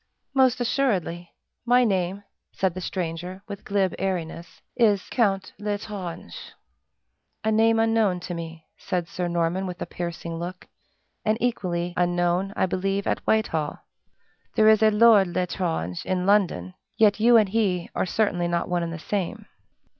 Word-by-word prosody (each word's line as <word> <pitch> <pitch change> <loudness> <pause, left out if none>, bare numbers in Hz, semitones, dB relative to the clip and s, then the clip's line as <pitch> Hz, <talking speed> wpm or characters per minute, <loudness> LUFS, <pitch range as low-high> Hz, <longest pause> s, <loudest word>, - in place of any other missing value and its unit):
"Most 260 -2 +4
assuredly! 195 -9 0 0.3
My 245 +1 +4
name," 195 -2 0 0.3
said 190 -2 0
the 185 - -6
stranger, 180 +1 -4
with 200 -1 -7
glib 195 -2 0
airiness, 170 -3 -4 0.2
"is 210 -5 +3
Count 195 -6 +1
L'Estrange." 205 - -5 1.1
"A 220 - +1
name 225 +1 +4
unknown 225 -5 +2
to 175 - -5
me," 165 -1 -7
said 175 -2 -2
Sir 180 +1 -3
Norman, 175 +2 0
with 180 0 -6
a - - -3
piercing 170 -1 -5
look, 180 +2 -7 0.6
"and 215 0 +1
equally 175 -7 -1
unknown, 175 +2 +1
I - - +2
believe, 195 +2 -1
at - - 0
Whitehall. 160 -9 +1 0.8
There 215 0 +6
is 220 -1 +5
a 220 - +6
Lord 210 -2 +6
L'Estrange 170 - -2
in 185 -1 -1
London; 180 - +2 0.3
but 215 -1 +5
you 235 +2 +6
and 215 -3 +4
he 190 -5 0
are - - -1
certainly 180 -3 0
not 170 0 -1
one 180 -1 0
and 170 -1 -3
the 165 - -5
same." 190 +2 -3
185 Hz, 150 wpm, -25 LUFS, 175-215 Hz, 1.1 s, There